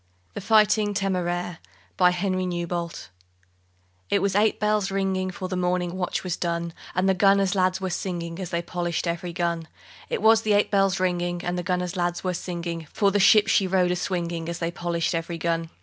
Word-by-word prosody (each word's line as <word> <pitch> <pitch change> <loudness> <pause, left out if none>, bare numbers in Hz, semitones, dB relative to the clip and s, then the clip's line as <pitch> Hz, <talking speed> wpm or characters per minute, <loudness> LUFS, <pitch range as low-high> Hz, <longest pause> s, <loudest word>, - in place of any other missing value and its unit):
THE - - -5
FIGHTING 210 0 +3
TÉMÉRAIRE 180 -2 -1 2.5
It 200 - +3
was 195 0 0
eight 210 +1 +3
bells 210 -2 +1
ringing, 190 -1 -1
For 185 0 -5
the 185 - -3
morning 180 -1 0
watch 185 -1 -2
was 180 -2 -2
done, 170 -1 -2 0.2
And 185 +1 +2
the 190 - +4
gunner's 195 0 +3
lads 185 -1 +1
were 190 -1 -3
singing, 170 -2 -4
As 185 -3 -4
they 170 -1 -2
polished 175 -1 -2
every 170 +1 -3
gun. 170 -2 -2 0.4
It - - -2
was 220 0 +6
eight 205 -1 +3
bells 195 -2 +2
ringing, 175 -1 -1
And 175 0 -1
the 180 - -2
gunner's 180 0 -2
lads 175 -1 -1
were 185 -1 0
singing 170 -2 -5
For 200 -2 +2
the 205 - +2
ship 210 +2 +6
she 195 -3 +3
rode 180 -1 +2
a - - +1
swinging, 170 -2 -3
As 170 - -3
they 165 0 -2
polished 170 0 -2
every 165 0 -3
gun. 165 0 -1
180 Hz, 180 wpm, -25 LUFS, 170-195 Hz, 2.5 s, was